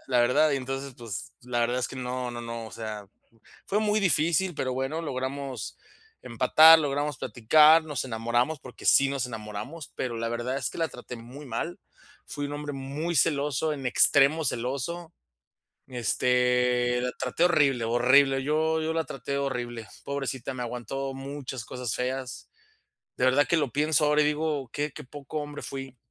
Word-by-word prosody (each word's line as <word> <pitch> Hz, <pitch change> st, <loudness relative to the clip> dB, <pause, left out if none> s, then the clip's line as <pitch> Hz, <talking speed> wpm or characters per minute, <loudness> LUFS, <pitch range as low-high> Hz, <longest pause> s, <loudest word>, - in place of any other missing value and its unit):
la 125 Hz, -2 st, +3 dB
verdad 125 Hz, +6 st, +4 dB
y -, -, +1 dB
entonces, 135 Hz, +1 st, -5 dB
pues, 115 Hz, -5 st, -6 dB
la 120 Hz, -1 st, -2 dB
verdad 120 Hz, +2 st, +1 dB
es 125 Hz, -, 0 dB
que 130 Hz, -, -9 dB
no 125 Hz, 0 st, -3 dB
no 120 Hz, -, -6 dB
no, 115 Hz, -1 st, -6 dB
o 110 Hz, -, -11 dB
sea, 105 Hz, -1 st, -6 dB, 0.6 s
fue 205 Hz, -, +1 dB
muy 215 Hz, 0 st, +2 dB
difícil, 170 Hz, 0 st, +2 dB
pero 130 Hz, -2 st, -2 dB
bueno, 135 Hz, +5 st, -2 dB
logramos 135 Hz, -3 st, -4 dB, 0.4 s
empatar, 160 Hz, +1 st, +7 dB
logramos 145 Hz, -1 st, -1 dB
platicar, 150 Hz, +8 st, +5 dB
nos 145 Hz, -4 st, -3 dB
enamoramos, 120 Hz, +5 st, 0 dB
porque 125 Hz, -2 st, -12 dB
sí 135 Hz, -, +6 dB
nos 135 Hz, -2 st, -1 dB
enamoramos, 115 Hz, +5 st, -7 dB
pero 120 Hz, -3 st, -3 dB
la 115 Hz, 0 st, -2 dB
verdad 120 Hz, +3 st, -2 dB
es -, -, -2 dB
que -, -, -10 dB
la 165 Hz, -1 st, 0 dB
traté 125 Hz, 0 st, -9 dB
muy 125 Hz, +5 st, -11 dB
mal. 135 Hz, +8 st, -4 dB, 0.5 s
Fui 145 Hz, -1 st, -5 dB
un 145 Hz, -, -6 dB
hombre 145 Hz, 0 st, -5 dB
muy 140 Hz, +5 st, -4 dB
celoso, 145 Hz, +1 st, +1 dB
en 135 Hz, -3 st, -7 dB
extremo 145 Hz, +5 st, +4 dB
celoso. 140 Hz, +8 st, -3 dB, 0.8 s
Este, 125 Hz, 0 st, +2 dB
la 125 Hz, 0 st, -2 dB
traté 130 Hz, +6 st, 0 dB
horrible 140 Hz, -9 st, +3 dB
horrible, 135 Hz, +3 st, +4 dB
yo 160 Hz, +3 st, +1 dB
yo 160 Hz, +1 st, -1 dB
la 160 Hz, -1 st, 0 dB
traté 135 Hz, +1 st, -4 dB
horrible, 120 Hz, -4 st, -3 dB, 0.2 s
pobrecita, 135 Hz, -2 st, -3 dB
me 125 Hz, -, -4 dB
aguantó 130 Hz, +3 st, -4 dB
muchas 135 Hz, -2 st, -6 dB
cosas 125 Hz, -3 st, -4 dB
feas. 130 Hz, 0 st, -4 dB, 0.7 s
De -, -, +1 dB
verdad 130 Hz, +3 st, +4 dB
que 170 Hz, -, +3 dB
lo 145 Hz, -6 st, 0 dB
pienso 150 Hz, +2 st, +2 dB
ahora, 150 Hz, 0 st, +4 dB
y -, -, +2 dB
digo: 150 Hz, -3 st, -1 dB
"Qué 145 Hz, 0 st, -2 dB
qué -, -, -9 dB
poco 145 Hz, +3 st, -7 dB
hombre 145 Hz, 0 st, -6 dB
fui", 135 Hz, -1 st, -7 dB
135 Hz, 170 wpm, -27 LUFS, 125-150 Hz, 0.8 s, empatar